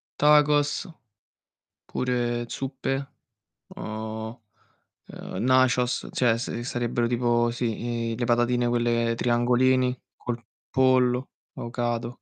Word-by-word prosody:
tacos. 150 +2 +3 1.0
Pure 120 -1 -1
zuppe, 135 0 -3 0.6
uhm, 110 +1 -6 0.7
ehm, 95 - -6
nachos, 130 -1 +3
cioè 115 -3 +2
se 120 0 -4
sarebbero 120 -1 -1
tipo 120 -1 +2
sì, 115 0 -2
i 115 - -2
le 120 - -1
patatine 120 0 +2
quelle 120 -1 +1
triangolini, 125 +2 +2 0.2
col 120 -1 -5 0.3
pollo, 130 -1 +2 0.2
avocado. 120 0 -3
120 Hz, 95 wpm, -26 LUFS, 120-130 Hz, 1.0 s, tacos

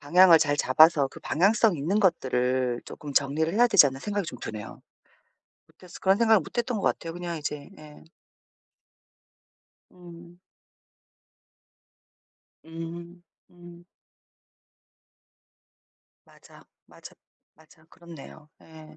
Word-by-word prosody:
방향을 170 +3 +5
잘 145 -2 0
잡아서 145 +2 +4
그 - - -14
방향성 200 +3 +1
있는 180 +9 -1
것들을 130 - 0
조금 145 -2 -10
정리를 145 +4 0
해야 240 +2 +4
되지 190 -9 +6
않나.' 135 0 -6
생각이 205 -4 -4
좀 125 - -8
드네요. 105 -2 -9 0.9
못했어 180 -1 -16
그런 190 +1 +2
생각을 225 -2 +4
못 160 - -12
했던 240 -1 -2
것 200 - -6
같아요. 165 - -2
그냥 175 -1 -6
이제 150 +1 -7
예. 150 -1 -15 1.9
음. 175 -1 -15 2.3
음 170 +2 -10 0.3
음. 175 -1 -16 2.4
맞아, - - -20 0.2
맞아, - - -15 0.4
맞아. 155 0 -24
그렇네요. 165 -3 -14
예. 160 -1 -16
165 Hz, 215 characters per minute, -25 LUFS, 145-180 Hz, 2.4 s, 되지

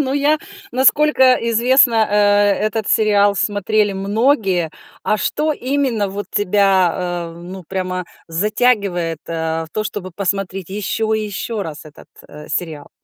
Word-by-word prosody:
Ну 270 -2 0
я, 295 +2 +2 0.3
насколько 265 0 +4 0.2
известно, 235 -1 +4
э, 205 - +1 0.5
этот 215 -1 -3
сериал 205 -2 +3
смотрели 205 +1 0
многие. 195 - +1 0.3
А 215 - +2
что 305 +7 -1
именно 260 -6 -1
вот 200 +2 -6
тебя, 185 -4 +1
э, 170 - -12
ну 185 +2 -9
прямо 185 +1 -4 0.2
затягивает, 190 -3 0
э, 160 0 -2
в - - -19
то, 215 - -2
чтобы 205 -4 -5
посмотреть 195 -1 -3
еще 215 +2 -2
и 215 - -2
еще 210 +1 -4
раз 155 -3 -8
этот, 150 - -15 0.2
э, 150 +1 -12
сериал? 155 -2 -4
205 Hz, 140 wpm, -18 LUFS, 180-225 Hz, 0.5 s, насколько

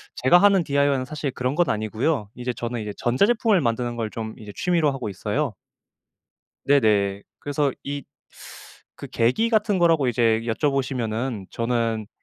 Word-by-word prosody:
제가 130 +8 +5
하는 195 -1 +5
DIY는 140 -3 +1
사실 145 +1 -4
그런 125 +2 -2
건 175 +1 +2
아니고요. 110 +3 -1
이제 125 0 -3
저는 120 -1 -4
이제 105 -1 -5
전자제품을 200 - +2
만드는 120 -3 -1
걸 115 -2 -3
좀 110 -1 -6
이제 105 -2 -10
취미로 170 -5 +1
하고 130 -5 -4
있어요. 105 +5 -2 1.1
네네. 105 -8 +2 0.2
그래서 145 -1 -1
이 140 0 -4 1.0
그 - - -6
계기 125 - +1
같은 215 -4 +2
거라고 165 -6 +3
이제 115 -2 +2
여쭤 120 +5 0
보시면은 120 -5 -2
저는 115 -2 -1
125 Hz, 330 characters per minute, -23 LUFS, 115-150 Hz, 1.1 s, 제가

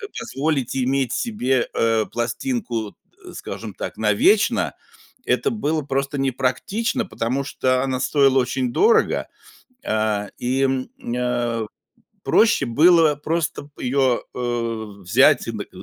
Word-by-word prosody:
п 415 - -6
позволить 150 - -2
иметь 130 -1 0
себе, 135 - 0
э, 115 -1 +2
пластинку, 120 - -3 0.3
э, - - -10
скажем - - -7
так, - - -6
навечно- 400 +4 +2 0.5
это - - +1
было 160 -8 -1
просто 135 0 -2
не 135 0 +1
практично, 135 - -1
потому 130 -5 -2
что 130 -2 0
она 130 -1 -1
стоила 135 -2 +3
очень 130 -1 -1
дорого, 450 - +3 0.6
а, 110 -2 0
и, 130 +2 -1
м, 135 -1 0 0.3
а, 120 -2 -1 0.6
проще 225 +1 +3
было 160 +4 +5
просто 160 0 -3
её, 130 -1 +1
э, 115 -2 -2 0.2
взять 90 - +4
и - - -2
н - - -6
к - - -7
130 Hz, 130 wpm, -22 LUFS, 120-155 Hz, 0.6 s, было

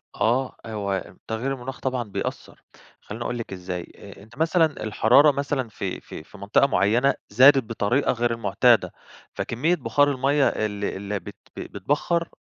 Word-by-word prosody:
آه، 125 +3 0
هو 100 -3 -4
تغيير 115 +5 -2
المناخ 130 0 -7
طبعًا 130 -2 -2
بيأثر، 105 -4 -6 0.4
خليني 115 +3 -7
أقول 120 - -3
لِك 115 - -6
إزاي، 90 -1 -6
أ 100 -1 -13
أنتِ 115 +4 -18
مثلًا 165 +1 +3 0.2
الحرارة 120 +7 +5
مثلًا 140 -3 -2
في - - -5
في 75 - -10
في 100 +4 -16
منطقة 100 +7 +2
معينة 120 +5 +2 0.2
زادت 135 +5 +6
بطريقة 115 +4 0
غير 120 -1 0
المعتادة، 115 +2 +2 0.4
فكمية 155 +10 0
بخار 145 0 +2
المَيَّة 135 +1 +2
اللي 105 -1 -2
اللي 100 +1 -4
بت 85 - -10 0.2
ب - - -8
بيتبخر 145 - -1
120 Hz, 155 wpm, -24 LUFS, 105-135 Hz, 0.4 s, زادت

